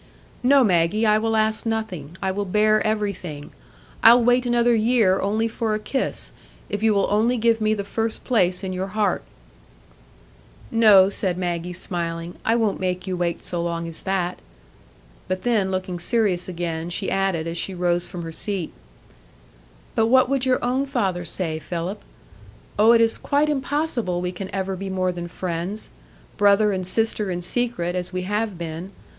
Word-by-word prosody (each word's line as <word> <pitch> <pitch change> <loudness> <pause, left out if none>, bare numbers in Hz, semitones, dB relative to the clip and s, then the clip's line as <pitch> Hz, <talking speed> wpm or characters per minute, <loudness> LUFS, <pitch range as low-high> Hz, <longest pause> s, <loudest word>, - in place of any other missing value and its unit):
"No, 270 +2 +5
Maggie, 185 +2 +2
I 215 0 +4
will 225 0 0
ask 220 0 +3
nothing; 190 -9 -4
I 190 - +1
will 205 +2 -2
bear 215 +3 +3
everything; 200 -9 -3 0.5
I'll 235 +1 +7
wait 245 +1 +3
another 240 0 +3
year 220 -4 +3
only 215 +3 0
for 225 -1 -2
a - - -2
kiss, 265 +5 -3 0.4
if 205 0 -3
you 220 0 +4
will 200 - +3
only 225 +4 +2
give 230 0 +2
me 215 0 +2
the 200 - -3
first 225 +2 -3
place 185 -6 +1
in 185 -1 -3
your 185 +1 -3
heart." 210 -1 +1 1.5
"No," 210 -4 +6
said 190 -3 -2
Maggie, 175 -1 -2
smiling, 170 -1 -4
"I 225 - +2
won't 220 -4 0
make 185 0 -2
you 185 -1 -2
wait 175 -1 -2
so 175 -1 -3
long 170 0 -3
as 165 - -7
that." 185 -2 -2 0.9
But 185 0 -3
then, 220 -6 +1
looking 185 -1 -3
serious 190 -2 0
again, 170 -1 -3
she 175 - -2
added, 195 -4 0
as 165 0 -4
she 190 - -3
rose 175 0 0
from 175 -1 -7
her 165 - -6
seat,— 185 0 -4 1.2
"But 225 - +2
what 255 +1 +4
would 270 -1 0
your 255 -1 +1
own 260 +3 0
father 185 -9 -1
say, 160 -2 -1
Philip? 175 +5 -4 0.8
Oh, 220 +2 +7
it 230 - +5
is 225 0 +2
quite 290 +1 +1
impossible 270 - -1
we 180 0 -2
can 185 +1 -7
ever 190 0 -3
be 195 +1 -5
more 185 -1 0
than 175 -1 -6
friends,—brother 200 +3 -1
and 185 -2 -3
sister 220 0 0
in 175 -1 -3
secret, 180 -5 -1
as 180 0 -3
we 185 0 -3
have 210 0 -2
been. 170 +3 -6
195 Hz, 175 wpm, -23 LUFS, 175-225 Hz, 1.5 s, I'll